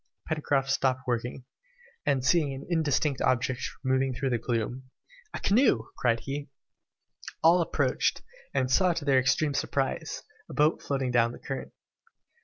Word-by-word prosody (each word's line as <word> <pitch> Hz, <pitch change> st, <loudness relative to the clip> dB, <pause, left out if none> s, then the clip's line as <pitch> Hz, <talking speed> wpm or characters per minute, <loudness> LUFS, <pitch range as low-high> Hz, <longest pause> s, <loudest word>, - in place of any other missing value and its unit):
Pencroft 145 Hz, -3 st, 0 dB
stopped 130 Hz, -1 st, +1 dB
working, 125 Hz, +1 st, -3 dB, 0.6 s
and 130 Hz, -2 st, +2 dB
seeing 145 Hz, -1 st, +2 dB
an 135 Hz, -, -8 dB
indistinct 150 Hz, -4 st, +1 dB
object 130 Hz, 0 st, +1 dB, 0.2 s
moving 130 Hz, -1 st, +1 dB
through 135 Hz, +1 st, -1 dB
the 120 Hz, -, +1 dB
gloom, 120 Hz, +3 st, -3 dB, 0.4 s
"A -, -, -5 dB
canoe!" 200 Hz, -, +3 dB
cried 115 Hz, -2 st, +1 dB
he. 140 Hz, +1 st, -5 dB, 0.9 s
All 170 Hz, +2 st, +6 dB
approached, 165 Hz, -, 0 dB, 0.3 s
and 130 Hz, -1 st, 0 dB
saw 180 Hz, +4 st, +4 dB
to 160 Hz, -3 st, -4 dB
their 135 Hz, -2 st, +4 dB
extreme 140 Hz, +3 st, +1 dB
surprise, 135 Hz, 0 st, -2 dB, 0.3 s
a -, -, -8 dB
boat 150 Hz, +2 st, +3 dB
floating 135 Hz, -3 st, -1 dB
down 120 Hz, -1 st, +3 dB
the -, -, -9 dB
current. -, -, -6 dB
135 Hz, 145 wpm, -28 LUFS, 125-150 Hz, 0.9 s, All